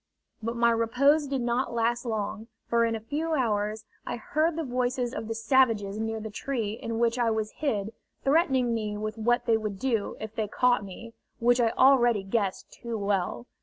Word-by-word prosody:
But 230 Hz, +2 st, -3 dB
my 235 Hz, 0 st, +4 dB
repose 275 Hz, +6 st, +3 dB
did 270 Hz, -2 st, -1 dB
not 240 Hz, +1 st, -1 dB
last 235 Hz, +1 st, 0 dB
long, 220 Hz, -1 st, -3 dB, 0.2 s
for 235 Hz, 0 st, +2 dB
in 225 Hz, 0 st, 0 dB
a -, -, -3 dB
few 305 Hz, +8 st, -2 dB
hours 215 Hz, -4 st, -1 dB, 0.2 s
I -, -, -4 dB
heard 310 Hz, +8 st, 0 dB
the 325 Hz, -, -2 dB
voices 250 Hz, -1 st, -1 dB
of 220 Hz, -, -5 dB
the 225 Hz, -, -3 dB
savages 225 Hz, -4 st, +2 dB
near 225 Hz, 0 st, -2 dB
the 220 Hz, 0 st, -6 dB
tree 225 Hz, -1 st, -2 dB
in 225 Hz, +1 st, -4 dB
which 235 Hz, +1 st, +1 dB
I 235 Hz, -1 st, +3 dB
was 220 Hz, -1 st, -1 dB
hid 220 Hz, -8 st, -2 dB, 0.3 s
threatening 270 Hz, -5 st, +2 dB
me 210 Hz, -2 st, -2 dB
with 215 Hz, +1 st, -4 dB
what 240 Hz, +2 st, +1 dB
they 230 Hz, -2 st, +3 dB
would 215 Hz, -3 st, -4 dB
do 225 Hz, -2 st, -1 dB
if 220 Hz, 0 st, -6 dB
they 220 Hz, -1 st, -2 dB
caught 245 Hz, +1 st, +2 dB
me, 215 Hz, +4 st, -10 dB, 0.2 s
which 245 Hz, +1 st, +3 dB
I 230 Hz, -, +3 dB
already 240 Hz, -4 st, +4 dB
guessed 195 Hz, -1 st, -2 dB
too 235 Hz, -2 st, -5 dB
well. 195 Hz, -, -1 dB
230 Hz, 195 wpm, -27 LUFS, 215-250 Hz, 0.3 s, my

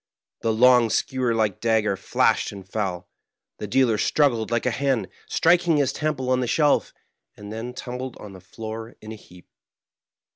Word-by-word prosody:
The 115 Hz, -, 0 dB
long, 120 Hz, +1 st, +5 dB
skewer 125 Hz, 0 st, 0 dB
like 110 Hz, -4 st, 0 dB
dagger 110 Hz, -3 st, +1 dB
flashed -, -, +1 dB
and 95 Hz, -2 st, -11 dB
fell. 95 Hz, -4 st, -3 dB, 0.5 s
The 105 Hz, -, -5 dB
dealer 115 Hz, 0 st, +2 dB
struggled 120 Hz, -7 st, +1 dB
like 120 Hz, -1 st, -1 dB
a -, -, +2 dB
hen, 130 Hz, -7 st, -1 dB, 0.2 s
strik 175 Hz, +1 st, +3 dB
ing 165 Hz, -3 st, +3 dB
his 140 Hz, -3 st, +1 dB
temple 140 Hz, -4 st, -2 dB
on 130 Hz, -, +2 dB
the 125 Hz, -, -1 dB
sheK, 150 Hz, +3 st, +2 dB, 0.5 s
and 105 Hz, +1 st, -9 dB
then 120 Hz, +3 st, -6 dB
tumbled 125 Hz, 0 st, -6 dB
on 105 Hz, -2 st, -11 dB
the 95 Hz, -, -12 dB
floor 110 Hz, +5 st, -8 dB
in 110 Hz, -, -10 dB
a -, -, -6 dB
heap. 90 Hz, -4 st, -17 dB
115 Hz, 175 wpm, -24 LUFS, 105-130 Hz, 0.5 s, long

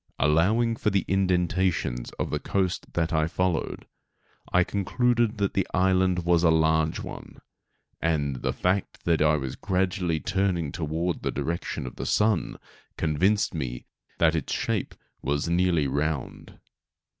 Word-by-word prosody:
Allowing 105 Hz, -, +2 dB
for 105 Hz, -, +1 dB
the 100 Hz, -1 st, 0 dB
indentations 90 Hz, -8 st, 0 dB
of -, -, -3 dB
the -, -, -1 dB
coast 95 Hz, -2 st, -1 dB
that 85 Hz, -1 st, 0 dB
I 80 Hz, -1 st, +2 dB
followed, 90 Hz, 0 st, -1 dB, 0.7 s
I 90 Hz, -, +4 dB
concluded 120 Hz, +4 st, +1 dB
that 100 Hz, -1 st, 0 dB
the 95 Hz, -, 0 dB
island 95 Hz, -1 st, +2 dB
was 85 Hz, -1 st, +4 dB
a 85 Hz, -, +4 dB
large 80 Hz, 0 st, +2 dB
one; -, -, -9 dB, 0.6 s
and, 75 Hz, -5 st, 0 dB
the -, -, -1 dB
fact 95 Hz, +2 st, -1 dB
that 85 Hz, -2 st, +2 dB
I 75 Hz, 0 st, +4 dB
was 65 Hz, -3 st, -3 dB
gradually 90 Hz, -3 st, 0 dB
turning 95 Hz, -4 st, 0 dB
toward 80 Hz, +1 st, -2 dB
the -, -, -1 dB
direction 85 Hz, -4 st, -3 dB
of 65 Hz, -, -8 dB
the -, -, -4 dB
sun 105 Hz, -4 st, +1 dB, 0.4 s
convinced 95 Hz, +7 st, +1 dB
me 65 Hz, -6 st, -4 dB, 0.3 s
that 80 Hz, -1 st, +4 dB
its 80 Hz, -, -2 dB
shape -, -, -1 dB, 0.3 s
was 70 Hz, +4 st, -1 dB
nearly 85 Hz, -3 st, +2 dB
round. 75 Hz, +1 st, -3 dB
85 Hz, 145 wpm, -26 LUFS, 80-95 Hz, 0.7 s, I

